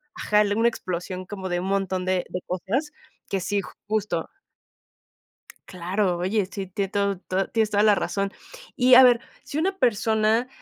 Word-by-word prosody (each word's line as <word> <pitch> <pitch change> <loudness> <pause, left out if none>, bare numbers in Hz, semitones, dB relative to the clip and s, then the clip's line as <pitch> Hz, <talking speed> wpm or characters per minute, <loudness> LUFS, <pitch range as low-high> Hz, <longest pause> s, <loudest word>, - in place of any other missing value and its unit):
Ajá, 210 0 +2
una 230 +1 +3
explosión 185 -2 -5
como 190 -1 -6
de 175 0 0
un 185 - -4
montón 190 -2 -1
de 185 -1 0
de 180 - -3
cosas, 210 - -2 0.4
que 195 - 0
sí 205 +2 0 0.3
Justo. 210 -6 -1 1.4
Claro, 180 +1 -1
oye, 190 +2 0
sí, 195 -2 -4
tiene 195 +1 -3
todo 200 -2 0
todo 190 0 -2
tienes 220 -2 +1
toda 205 0 +2
la 210 -1 +6
razón. 200 0 -2 0.4
Y 250 -1 +6
a 260 - +10
ver, 245 -2 +6 0.2
si 290 - -6
una 380 +3 0
persona, 225 - +2
200 Hz, 165 wpm, -24 LUFS, 185-220 Hz, 1.4 s, a